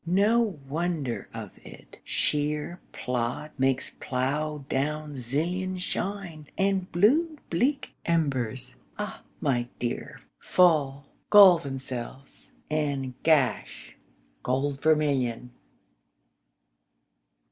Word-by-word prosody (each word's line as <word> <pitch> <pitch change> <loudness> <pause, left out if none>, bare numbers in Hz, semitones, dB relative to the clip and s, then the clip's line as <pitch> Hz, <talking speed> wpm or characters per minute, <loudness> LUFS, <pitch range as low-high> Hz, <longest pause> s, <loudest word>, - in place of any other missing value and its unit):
No 205 +3 +2
wonder 155 -4 -2
of - - -7
it: - - -13
shéer 150 +3 0
plód 125 +4 -3
makes 130 0 +1
plough 145 +3 -2
down 150 +2 -1
sillion 170 +9 -2
Shine, 180 -4 -4
and 195 -1 +1
blue 300 - +3
bleak 260 - +1
embers, 130 -7 0 0.2
ah - - -5 0.2
my 120 -3 0
dear, 120 -1 -4 0.2
Fall, 145 -6 +3 0.2
gall 195 -4 +9
themselves, 135 -2 -7 0.2
and 140 -4 -1
gash 150 -5 +1 0.5
gold 135 +2 -1
vermilion. 140 -6 +1
150 Hz, 85 wpm, -27 LUFS, 130-175 Hz, 0.5 s, gall